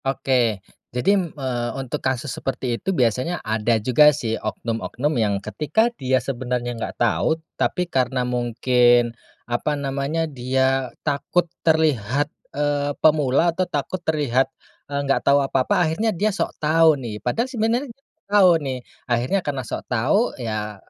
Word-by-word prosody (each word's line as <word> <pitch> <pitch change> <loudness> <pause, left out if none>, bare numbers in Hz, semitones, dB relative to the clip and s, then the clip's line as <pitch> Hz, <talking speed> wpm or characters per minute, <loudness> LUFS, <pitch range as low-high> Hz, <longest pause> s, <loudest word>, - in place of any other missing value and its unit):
Oke. 135 0 -1 0.6
Jadi, 180 +7 +1
eee, 120 -3 -2
untuk 135 -2 -4
kasus 130 +1 -1
seperti 130 -2 -2
itu, 190 - -3
biasanya 130 - 0
ada 110 +1 +1
juga, 130 +7 +5
sih, 120 -6 -2
oknum-oknum 115 +6 -3
yang 105 -4 +1
ketika 155 - 0
dia 130 - +1
sebenarnya 125 -1 -3
enggak 115 - -6
tahu, 120 +7 +1 0.2
tapi 180 0 0
karena 130 -4 0
mungkin, 120 0 +2 0.3
apa 120 +5 -1
namanya, 140 +4 -1
dia 130 -1 0 0.2
takut 160 +4 +1 0.2
terlihat, 145 -5 +2 0.2
eee, 145 0 0
pemula, 155 +2 +3
atau 185 - +1
takut 160 +5 -3
terlihat, 135 -5 +1 0.4
eee, 140 - -1
enggak 135 - +1
tahu 140 0 +4
apa-apa, 135 -2 +1
akhirnya 215 +8 0
dia 205 +2 0
sok - - -1
tahu, 155 -1 +4
nih. 105 -5 -6
Padahal 230 - 0
sebenarnya 240 +2 0
enggak 270 +3 -19
tahu, 200 -3 +6
nih. 135 -4 -3 0.3
Akhirnya 125 +10 +1
karena 145 -6 -3
sok 110 - -6
tahu, 130 - +1
ya, 105 -2 -3
135 Hz, 145 wpm, -22 LUFS, 120-160 Hz, 0.6 s, tahu